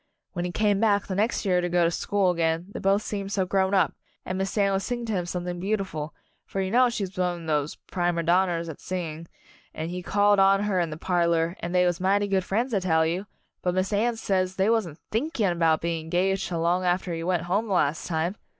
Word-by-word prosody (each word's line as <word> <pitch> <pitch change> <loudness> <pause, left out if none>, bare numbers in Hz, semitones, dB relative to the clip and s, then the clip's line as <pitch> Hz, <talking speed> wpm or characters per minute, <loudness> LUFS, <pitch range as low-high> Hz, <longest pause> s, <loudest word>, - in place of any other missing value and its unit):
When 175 -1 -2
he 180 - -3
came 205 +1 +2
back 205 -2 +2
the 190 - -4
next 210 +3 0
year 180 -2 +3
to 175 - -1
go 175 0 +3
to 170 - +2
school 195 +1 +1
again 165 0 0
they - - -6
both 195 +2 +2
seemed 200 -1 -4
so 195 -2 +1
grown 190 +1 +1
up, 180 -6 +3 0.3
and 185 - -3
Miss 190 +2 -2
Anne 200 -1 +3
would 195 - +1
sing 240 +2 -3
to 220 - -2
him 180 -3 -1
something 175 0 -4
beautiful 190 -6 -3 0.3
for 195 - -5
you 190 0 -1
know 250 +2 +5
she's 200 -5 -4
one 175 -2 -2
of 150 -2 +2
these 145 - -8
'primer 175 -2 -2
donners' 170 0 +2
at 160 - -8
singing, 165 -3 -5 0.5
and 160 +2 -4
he 180 0 -4
called 205 +2 +3
on 195 +1 +5
her 200 -3 +1
in 170 -2 0
the 155 - -6
parlor, 170 -1 +1
and 175 +2 -4
they 180 0 +4
was 175 -1 0
mighty 200 +2 +2
good 195 -1 +1
friends, 230 +7 -1
I 200 - +3
tell 160 -3 +2
you, 180 +5 -2 0.3
but 180 0 0
Miss 185 +2 0
Anne 230 +3 +1
says 190 -4 -1
they 195 +3 +2
wasn't 195 -10 0
thinking 220 - 0
'bout 160 -1 +3
being 165 -1 -2
engaged 185 +3 0
till 170 -2 -2
long 175 +2 +1
after 180 0 0
he 165 0 -4
went 175 -1 0
home 200 +6 0
the 200 - -1
last 155 -3 +1
time! 170 +4 -1
185 Hz, 240 wpm, -26 LUFS, 170-200 Hz, 0.5 s, know